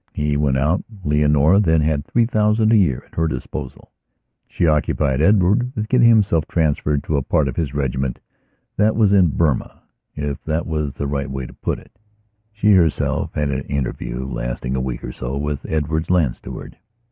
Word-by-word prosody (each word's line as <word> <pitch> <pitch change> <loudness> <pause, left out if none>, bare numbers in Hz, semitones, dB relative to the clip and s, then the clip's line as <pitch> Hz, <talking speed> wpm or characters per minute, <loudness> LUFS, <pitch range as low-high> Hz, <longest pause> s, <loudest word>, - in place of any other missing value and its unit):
He 75 0 -1
went 70 -2 +1
out. 75 +7 +1 0.2
Leonora 75 +4 +3
then 80 -6 +3
had 75 -2 0
three 115 +8 +1
thousand 110 -1 +2
a - - +6
year 80 - +2
at - - -30
her 80 0 0
disposal. 65 -1 -6 0.6
She - - -1
occupied 75 -3 +1
Edward 105 - +3
with 110 0 -3
getting 125 -2 +5
himself 100 -9 +3
transferred 75 -3 0
to 75 - -1
a - - +1
part 70 +2 +1
of 65 - -4
his 70 -4 -3
regiment 65 -2 -2 0.6
that 105 +2 +3
was 105 -3 +3
in 95 -3 +5
Burmaif 75 -7 0 0.7
that 80 +1 -1
is 75 -4 -2
the 70 - -3
right 70 -1 -2
way 65 -1 -4
to - - -11
put - - -3
it. - - -16 0.6
She 105 0 +2
herself 85 -6 +1
had 75 -2 0
an 65 0 -2
interview, 65 -2 -3
lasting - - -4
a 65 - -1
week 65 -1 -4
or - - -5
sowith 70 +3 -4
Edward's 80 +1 -1
land 80 -9 +2
steward. - - -10
75 Hz, 180 wpm, -20 LUFS, 70-90 Hz, 0.7 s, a